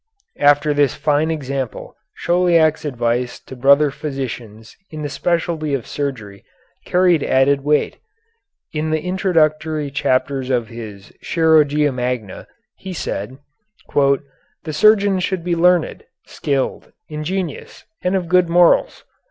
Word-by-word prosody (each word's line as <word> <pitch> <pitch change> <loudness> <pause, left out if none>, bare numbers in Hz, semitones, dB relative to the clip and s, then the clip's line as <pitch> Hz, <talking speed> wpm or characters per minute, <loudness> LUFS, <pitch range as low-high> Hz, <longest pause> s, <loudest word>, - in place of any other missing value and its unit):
After 145 +1 +4
this 145 -3 +2
fine 150 +1 +1
example, 140 -5 -4 0.2
Chauliac's 170 -3 +2
advice 120 -2 -2
to 130 - -11
brother 140 +3 +4
physicians 125 -7 -7
in 155 -1 -7
the 145 - -3
specialty 160 -1 -1
of 125 - -5
surgery 115 -9 -5 0.4
carried 180 -3 +3
added 135 +1 +2
weight. 150 +1 +1 0.8
In 155 0 -2
the 155 0 0
Introductory 155 -5 0
chapter 135 -1 0
of 120 -2 0
his 110 -4 -10
"Chirurgia 150 -3 +3
Magna" 125 -5 -4 0.3
he 190 -1 -8
said: 130 - -5 0.6
"The 140 +2 -2
surgeon 200 +2 +4
should 180 -1 -2
be 175 0 0
learned, 175 0 +2 0.2
skilled, 140 -3 -3 0.2
ingenious, 160 +2 -5 0.2
and 180 +1 +1
of 180 -3 -1
good 180 0 +3
morals. 175 0 +3
150 Hz, 120 wpm, -19 LUFS, 135-165 Hz, 0.8 s, After